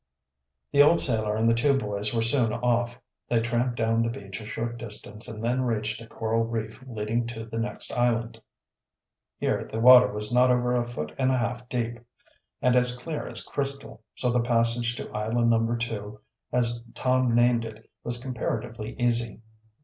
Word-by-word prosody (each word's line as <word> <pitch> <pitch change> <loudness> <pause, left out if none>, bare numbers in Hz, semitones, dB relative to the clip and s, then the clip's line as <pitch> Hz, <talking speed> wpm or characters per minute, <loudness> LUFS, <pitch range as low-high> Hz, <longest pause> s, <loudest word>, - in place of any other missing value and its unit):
The 140 - +6
old 160 +4 +6
sailor 110 -4 +1
and 110 +1 +1
the 115 - +5
two 135 +4 +3
boys 105 -3 0
were 115 -1 +1
soon 115 -1 +3
off. 120 +1 0 0.3
They 120 - +3
tramped 120 +1 -1
down 115 0 +2
the 115 - +1
beach 100 -3 -7
a 105 - -9
short 120 +1 -4
distance 105 -1 -5
and 110 -2 -6
then 125 +2 +1
reached 110 -3 -1
a 115 - -10
coral 115 0 -1
reef 115 +2 -4
leading 115 0 -2
to 115 -1 -6
the 115 0 -5
next 115 - -4
island. 120 -1 0 1.0
Here - - -1
the 110 - -3
water 125 +1 +8
was 105 +2 -3
not 125 +1 +5
over 125 0 +2
a 120 - +2
foot 75 -11 -5
and 130 - +3
a 130 - +2
half 125 0 -3
deep, 120 -1 -2 0.6
and 125 0 +4
as 125 0 +2
clear 150 +5 -5
as - - -5
crystal, 140 -5 -4
so 125 - +1
the 120 - +2
passage 115 0 +1
to - - -6
Island 115 +2 +1
No. 115 +1 +2
2, 110 -3 -4 0.3
as 120 -1 +1
Tom 130 -2 +2
named 120 -1 +4
it, 110 -1 -9 0.2
was 120 0 -1
comparatively 115 -3 -4
easy. 120 -2 +1
115 Hz, 180 wpm, -26 LUFS, 115-125 Hz, 1.0 s, water